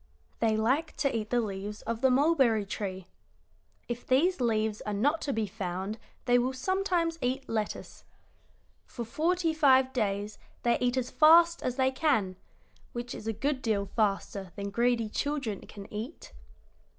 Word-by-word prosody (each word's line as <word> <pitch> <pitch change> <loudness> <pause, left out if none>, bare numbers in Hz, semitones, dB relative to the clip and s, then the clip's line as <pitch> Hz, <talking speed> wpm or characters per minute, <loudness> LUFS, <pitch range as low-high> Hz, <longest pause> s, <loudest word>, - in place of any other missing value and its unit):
"They 220 -1 +2
like 260 +9 +1
to 275 -4 0
eat 215 -1 -2
the 245 - +2
leaves 205 0 -5
of 230 0 -3
the 265 - +5
mulberry 260 -6 +3
tree. 190 -2 -5 0.8
If 240 0 -5
these 300 +5 +3
leaves 220 -2 0
are 210 - -3
not 290 +10 +1
to 285 - -2
be 225 -4 0
found 190 +1 -4 0.3
they 245 0 +4
will 255 +2 0
sometimes 345 +2 0
eat 260 +2 -1
lettuce. 215 -2 -4 0.8
For 235 - -6
forty 330 +7 0
five 265 -4 +4
days 205 -3 -2 0.2
they 235 0 +2
eat 250 +1 +1
as 250 -1 -1
fast 335 +2 +6
as 250 - -2
they 260 0 +2
can, 260 - +1 0.6
which 240 0 -5
is 215 - -8
a - - +1
good 275 +5 -1
deal 210 -4 0
faster 200 -3 -1
than 200 0 -4
greedy 235 +1 +1
children 270 -3 -2
can 200 -1 -10
eat. 225 +10 -7
240 Hz, 160 wpm, -29 LUFS, 210-275 Hz, 0.8 s, fast